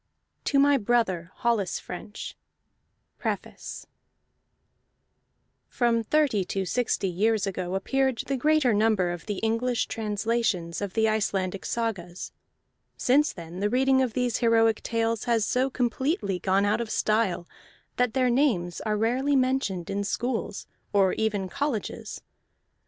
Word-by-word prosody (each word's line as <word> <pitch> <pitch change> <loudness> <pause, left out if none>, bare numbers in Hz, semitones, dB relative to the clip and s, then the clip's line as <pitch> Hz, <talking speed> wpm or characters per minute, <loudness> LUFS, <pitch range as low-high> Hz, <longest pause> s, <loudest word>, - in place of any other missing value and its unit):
A. - - -45
TO 280 - +2
MY 285 0 +5
BROTHER 205 -7 0
HOLLIS 225 -7 0
FRENCH 205 +4 -8 0.8
PREFACE - - -5 1.8
From 235 -2 +1
thirty 275 -6 +2
to 190 +1 -2
sixty 235 -2 0
years 210 +4 +1
ago 185 -1 -3
appeared 265 +5 +1
the 275 - -1
greater 295 -2 +3
number 205 -4 +2
of 175 +2 -7
the 205 -2 -2
English 230 +2 +1
translations 210 -5 -1
of 200 -2 -3
the 220 0 +3
Icelandic 195 -3 -1
sagas. 195 -7 -3 0.7
Since 285 +4 +3
then 170 +1 -8
the 205 +1 +1
reading 265 +2 +3
of 250 -4 0
these 250 -2 0
heroic 225 -2 +3
tales 230 -1 -1
has 230 -3 +2
so 255 +2 +1
completely 245 - -1
gone 195 +2 +2
out 205 +3 +1
of 230 - -4
style 215 -5 +1 0.5
that 250 -3 +1
their 255 -2 +3
names 220 - +1
are 210 -1 -1
rarely 255 +6 +1
mentioned 255 -10 0
in 200 +1 -1
schools 230 +1 -2 0.3
or 195 -2 +4
even 210 -3 -1
colleges. 260 +2 -3
225 Hz, 135 wpm, -27 LUFS, 195-250 Hz, 1.8 s, MY